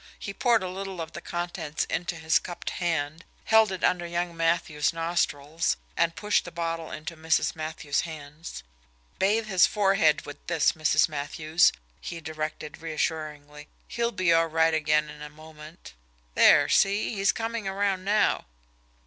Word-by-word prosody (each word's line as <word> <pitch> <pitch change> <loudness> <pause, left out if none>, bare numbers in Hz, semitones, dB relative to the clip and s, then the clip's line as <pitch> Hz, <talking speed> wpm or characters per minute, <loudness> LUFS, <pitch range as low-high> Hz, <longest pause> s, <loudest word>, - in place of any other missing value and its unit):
He 200 - -6
poured 230 0 +2
a - - -2
little 190 0 -6
of 165 -1 -5
the - - -8
contents 175 -3 -3
into 175 0 -3
his 160 -1 +2
cupped 175 - -6
hand, 165 -2 -2 0.2
held 220 -2 +5
it 190 - -5
under 175 -1 +2
young 170 0 -2
Matthews' 165 -2 +1
nostrils, 165 -2 -1 0.2
and 165 0 +1
pushed 210 0 +1
the 175 - -9
bottle 165 -1 -3
into 155 +2 -6
Mrs. 160 0 +1
Matthews' 155 -2 -2
hands. 155 - -8 0.6
"Bathe 215 +4 +2
his 190 -4 +4
forehead 195 -7 +3
with 145 - -11
this, 165 -3 +3
Mrs. 155 0 +3
Matthews," 155 +3 +2 0.3
he 170 - -6
directed 155 -1 -6
reassuringly. 150 -2 -4 0.2
"He'll 235 0 -1
be 185 -6 +2
all 165 0 +4
right 160 0 +2
again 150 -1 +2
in 150 0 -11
a 150 - -7
moment. 155 - -13 0.4
There, - - +6
see 200 +3 +2
he's 195 -1 +2
coming 225 -2 -4
around 195 -1 0
now." 210 +2 +2
165 Hz, 155 wpm, -27 LUFS, 155-185 Hz, 0.6 s, There